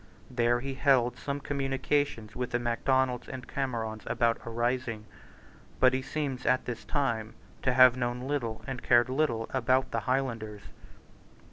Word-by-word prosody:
There 120 0 +2
he 135 +1 -4
held 130 -3 +3
some 140 0 -4
communications 135 -5 -1
with 125 0 -2
the 120 - 0
Macdonalds 125 +1 0
and 130 -1 -7
Camerons 115 -5 -3
about 115 -1 +1
a - - -5
rising. 120 -1 -1 0.7
But 130 0 +5
he 130 - 0
seems 135 -3 -3
at 125 0 +2
this 120 -2 -5
time 115 -6 -1 0.3
to 130 - +1
have 130 -1 +7
known 120 -1 -2
little 125 -5 -3
and 130 -1 -5
cared 120 0 +4
little 130 -5 0
about 130 +1 +2
the - - 0
Highlanders. 115 -6 -2
125 Hz, 150 wpm, -29 LUFS, 115-135 Hz, 0.7 s, have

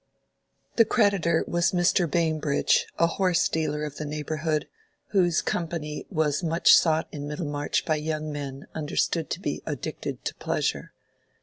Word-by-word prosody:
The 230 - +7
creditor 200 -8 +2
was 175 +1 +1
Mr. 175 -1 +2
Bambridge, 155 -3 +1
a 170 - +4
horse 180 +1 +2
dealer 150 -2 -1
of 150 -2 -5
the 155 - -4
neighborhood, 155 +1 -2 0.4
whose 175 -5 +2
company 160 -3 -3
was 155 -4 0
much 165 -1 +4
sought 160 -1 +4
in 145 -1 -6
Middlemarch 145 -1 -2
by 155 -2 +1
young 155 0 -3
men 140 -1 -6
understood 160 +1 -1
to - - -3
be - - -3
"addicted - - -5
to - - -1
pleasure." - - -2
155 Hz, 140 wpm, -26 LUFS, 150-170 Hz, 0.4 s, The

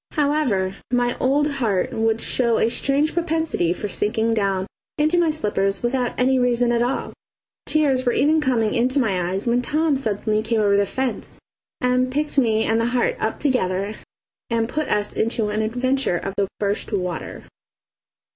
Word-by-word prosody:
However, 280 - +1 0.2
my 245 0 +1
old 285 +3 +2
heart 230 -10 -1
would 225 0 0
show 235 -3 +2
a 225 - +2
strange 280 +5 +1
propensity 325 - 0
for 195 +4 -3
sinking 220 +2 0
down 195 -3 0 0.3
into 310 +3 +2
my 340 -2 +3
slippers 205 -9 -1
without 245 0 -1
any 260 +1 +3
reason 245 -1 +2
at 235 0 +1
all. 250 +3 -2 0.5
Tears 280 -4 +2
were 245 - +2
even 305 +6 +2
coming 235 -6 +1
into 255 +4 +1
my 185 -8 0
eyes 190 +2 -2
when 240 +1 +2
Tom 305 +3 +1
suddenly 215 -3 -1
came 225 0 0
over 200 -1 +3
the 200 0 +2
fence 260 +3 -3 0.4
and 250 0 +1
picked 295 +1 0
me 220 -3 +2
and 225 +1 +1
the 230 - +1
heart 245 0 +1
up 220 - -2
together 200 -7 0 0.6
and 230 -1 0
put 305 +5 -2
us 210 0 0
into 220 -1 0
an 210 +1 -1
adventure 250 -1 0
of 195 - -5
the 200 - 0
first 200 0 -2
water. 180 -4 -4
240 Hz, 170 wpm, -22 LUFS, 210-270 Hz, 0.6 s, my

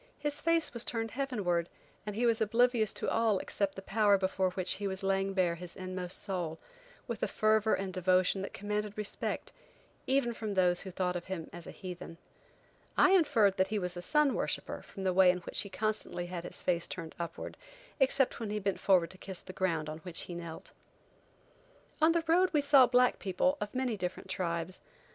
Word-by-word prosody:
His 290 0 -2
face 330 -3 +2
was 235 -1 +1
turned 225 -1 -2
heavenward, 205 -11 -1 0.4
and 210 - -3
he 240 +3 +1
was 230 -1 +3
oblivious 230 0 +3
to - - -3
all 225 -1 +2
else - - -2
except 200 -1 -1
the 195 - -8
power 205 0 +3
before 190 0 0
which 185 0 0
he 200 - 0
was 190 0 -1
laying 195 0 +1
bare 180 -3 +2
his 175 0 -7
inmost 185 -1 -1
soul, 175 -5 -2 0.5
with 235 -2 -4
a - - +1
fervor 215 0 +3
and 190 -1 -4
devotion 185 +1 +2
that 195 - -5
commanded 210 0 -3
respect, 210 -1 -4 0.6
even 260 -3 +2
from 215 -3 -4
those 180 -1 +3
who 190 - -7
thought 180 -1 -1
of 175 - -4
him 185 -4 -5
as 175 -1 -8
a - - -6
heathen. 180 -2 -8 0.8
I 375 - +6
inferred 235 - +4
that 190 0 +3
he 215 +2 -1
was 180 -2 -2
a 175 - -5
sun 300 +7 +3
worshipper - - -3
from 195 - -9
the 185 -1 +1
way 185 0 +6
in 180 - +3
which - - -2
he 200 - -6
constantly 210 -2 -2
had 175 -1 -6
his - - -6
face 175 -2 +1
turned 165 -3 -6
upward, 170 -1 -5 0.4
except 270 -1 +2
when 225 -3 -4
he 210 - -2
bent 195 -2 -1
forward 185 -4 +3
to 185 - -14
kiss 190 -2 -6
the 185 - -9
ground 165 -5 0
on 155 +1 -6
which 170 0 -4
he 175 - -7
knelt. 170 -2 -8 1.3
On 320 +1 +6
the 335 -1 +1
road 355 +3 +4
we 300 - +4
saw 280 -3 +7
black 250 +1 +3
people 200 +9 +1
of 210 +2 -4
many 255 -3 0
different 185 +1 -4
tribes. 170 -1 -3
195 Hz, 205 wpm, -32 LUFS, 180-225 Hz, 1.3 s, saw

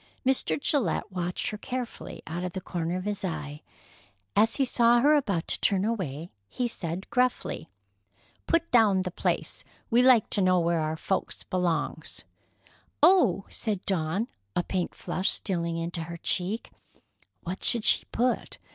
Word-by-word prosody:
Mr. 250 - +2
Gillette 225 - 0
watched 180 -1 -2
her 210 - -6
carefully 245 -9 -6
out 175 +3 -4
of 180 -1 -4
the 190 - -3
corner 170 -1 -3
of 185 - -4
his 205 0 -3
eye. 150 -4 -4 0.7
As 225 +2 +4
he 270 - +2
saw 240 -1 +4
her 290 +5 +5
about 200 - +1
to - - +1
turn 195 -1 +2
away, 175 -8 -3 0.2
he 250 - -1
said 180 -4 -4
gruffly: 250 -9 0 0.8
"Put 335 0 +1
down 210 -6 +5
the 180 - -4
place. - - -2 0.3
We 235 +2 +5
like 250 -4 +6
to 205 - +2
know 185 -1 +4
where 170 0 +1
our 155 0 -1
folks 190 +4 -3
belongs." 170 -4 -2 0.8
"Oh!" 310 - +5
said 210 -5 -3
Dawn, 190 +3 0 0.3
a 175 - +1
pink 180 -1 -2
flush 185 +2 -1
stealing 170 -4 -1
into 165 0 -3
her 170 +1 -7
cheek. 185 +6 -1 0.7
What 180 +3 -5
should 235 -2 +3
she - - +3
put? 245 +1 -1
185 Hz, 155 wpm, -27 LUFS, 170-230 Hz, 0.8 s, like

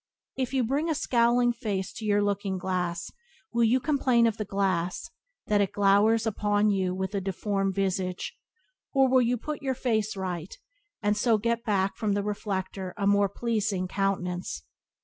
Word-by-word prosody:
If 260 -2 -2
you 265 -2 +1
bring 280 +8 0
a 320 - +1
scowling 240 -4 +3
face 200 -6 -3
to 220 - -7
your 205 -1 +3
looking 200 -1 -1
glass 180 -2 -2 0.4
will 235 0 +3
you 245 +4 +3
complain 260 -4 +2
of 225 -1 +1
the 215 - -3
glass 185 -3 -1 0.3
that 210 -2 +2
it 200 0 0
glowers 205 +3 +4
upon 205 -1 +2
you 185 -2 0
with 190 +2 -3
a 200 - -1
deformed 195 0 -1
visage, 185 -2 -2 0.6
or 270 -1 +5
will 260 0 +4
you 245 +1 +1
put 300 +5 -5
your 265 -2 -1
face 220 -5 0
right, 180 -2 -4 0.5
and 210 0 +2
so 225 +1 +3
get 230 +2 -1
back 195 -4 0
from 210 -2 0
the 200 0 0
reflector 195 -2 -4
a 200 - -1
more 200 0 +4
pleasing 210 -3 -1
countenance? 180 - -2
205 Hz, 170 wpm, -27 LUFS, 190-235 Hz, 0.6 s, or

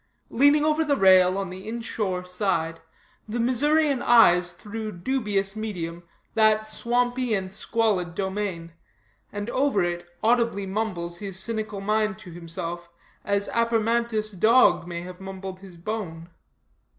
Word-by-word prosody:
Leaning 285 +4 +4
over 310 +1 +2
the 290 -2 +1
rail 185 -1 +6
on 195 -2 -3
the 190 +3 -9
inshore 215 -5 -3
side, 180 -3 -1 0.5
the 235 +3 -2
Missourian 280 +3 +2
eyes 180 -7 +5
through 220 +4 -7
the 180 - -11
dubious 205 -3 -1
medium 175 -6 -5 0.3
that 215 -1 +3
swampy 245 +1 0
and 190 -1 -4
squalid 205 -5 0
domain; 190 -4 -3 0.6
and 205 +1 -5
over 265 -8 +2
it 175 0 -3
audibly 230 -3 +2
mumbles 190 -4 -3
his 195 -2 -4
cynical 215 -1 -3
mind 215 0 0
to 180 - -12
himself, 170 0 -6 0.3
as 200 0 0
Apermantus' 230 -1 +1
dog 220 -2 +4
may 170 -1 -5
have 180 +1 -10
mumbled 190 -1 -7
his 190 -3 -13
bone. 170 -3 -5
205 Hz, 135 wpm, -25 LUFS, 180-230 Hz, 0.6 s, rail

